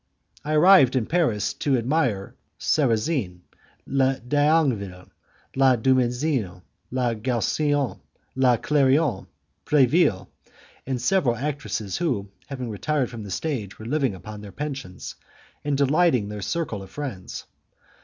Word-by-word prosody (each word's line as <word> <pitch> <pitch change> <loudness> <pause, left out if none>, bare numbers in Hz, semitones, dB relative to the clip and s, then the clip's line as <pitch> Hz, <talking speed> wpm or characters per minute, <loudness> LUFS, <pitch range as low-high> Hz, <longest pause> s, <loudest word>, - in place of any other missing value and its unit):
I 155 +1 -2
arrived 155 -5 +6
in 125 -4 +1
Paris 120 - 0
to 140 -3 0
admire 120 -6 0 0.3
Sarrazin, 120 - 0 0.4
La 135 0 +2
Dangeville, 130 - 0 0.4
La 135 -1 +5
Dumesnil, 125 - 0 0.3
La 125 -2 0
Gaussin, 130 +5 0 0.4
La 130 -2 +4
Clairon, 140 -4 +2 0.4
Preville, 140 - +3 0.6
and 130 -2 -1
several 125 -2 +2
actresses 135 -7 -3
who, 115 - -2 0.2
having 130 -5 -5
retired 135 +5 -1
from 115 -2 -7
the 105 - -8
stage, 110 - -3
were 110 - -10
living 135 -4 0
upon 105 +3 -9
their 105 -1 -10
pension, 135 -10 -6 0.7
and 145 -1 0
delighting 140 -6 +2
their 105 -1 -6
circle 145 - -3
of 95 - -11
friends. 105 -6 -6
130 Hz, 120 wpm, -24 LUFS, 110-145 Hz, 0.7 s, arrived